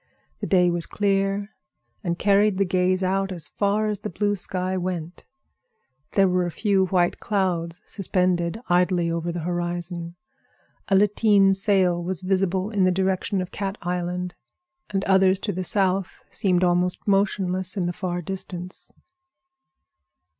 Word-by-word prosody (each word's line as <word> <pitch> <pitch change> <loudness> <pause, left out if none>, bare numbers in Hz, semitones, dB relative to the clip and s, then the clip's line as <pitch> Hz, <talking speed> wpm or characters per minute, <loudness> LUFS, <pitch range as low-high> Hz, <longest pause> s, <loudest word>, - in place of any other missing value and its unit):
The - - -3
day 180 -3 +4
was 170 -1 -2
clear 200 0 0 0.5
and 170 -1 -1
carried 205 0 +3
the 195 - +2
gaze 185 +1 +1
out 195 +1 0
as 165 -5 -7
far 205 +1 0
as 210 -2 -1
the 210 - -5
blue 205 +3 0
sky 185 0 -2
went; 180 -2 -4 0.9
there 195 -1 +4
were 180 -1 +1
a - - -2
few 195 +1 +1
white 175 -1 +1
clouds 175 -4 -1
suspended 180 -1 0
idly 175 -1 +2
over 170 +1 -2
the 170 0 -4
horizon. 175 0 -3 0.7
A 195 - +3
lateen 205 -1 +4
sail 190 -3 +2
was 185 +1 -3
visible 190 +1 0
in 200 -3 +2
the 185 - +5
direction 190 +1 0
of 180 - -6
Cat 195 0 -4
Island, 180 0 -2 0.6
and 195 -1 -1
others 190 -1 +4
to 205 - -2
the 185 +1 -3
south 190 0 -1
seemed 185 -4 +1
almost 180 +1 +1
motionless 190 -2 0
in 180 - 0
the 175 - -1
far 175 -2 -3
distance. 185 0 -5
185 Hz, 145 wpm, -24 LUFS, 175-195 Hz, 0.9 s, the